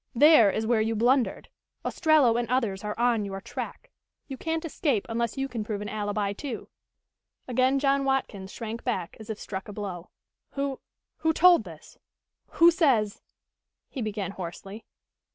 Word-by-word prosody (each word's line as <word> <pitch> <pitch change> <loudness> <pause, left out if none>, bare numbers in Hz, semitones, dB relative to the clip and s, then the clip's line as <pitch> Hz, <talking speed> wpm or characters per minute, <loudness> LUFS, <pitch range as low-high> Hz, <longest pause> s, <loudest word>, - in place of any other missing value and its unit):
There 290 -5 +7
is 220 +3 -1
where 225 -1 +2
you 225 +1 0
blundered. 245 +3 +1 0.4
Ostrello 305 -8 +3
and 240 -1 -1
others 225 -7 0
are 210 0 -4
on 235 -3 +2
your 195 -1 -5
track. 245 - -7 0.4
You 270 - -5
can't 320 +4 -3
escape 280 - 0
unless 235 +1 -2
you 270 0 -1
can 235 -5 -4
prove 210 -1 -4
an 210 0 -5
alibi, 205 -1 -2
too." 245 +2 -6 0.8
Again 255 +2 +2
John 275 0 +2
Watkins 240 -8 -2
shrank 230 0 -6
back 180 -1 -2
as 220 +1 -11
if 220 - -4
struck 190 -1 -6
a - - -7
blow. 190 -4 -6 0.4
"Who 275 -1 -2 0.4
who 320 0 +1
told 350 -8 +6
this 160 -3 -13 0.5
who 340 +1 +5
says 260 - +2 0.3
" - - -61
he 265 - -5
began 205 -3 -3
hoarsely. 195 +3 -8
230 Hz, 165 wpm, -27 LUFS, 205-270 Hz, 0.8 s, There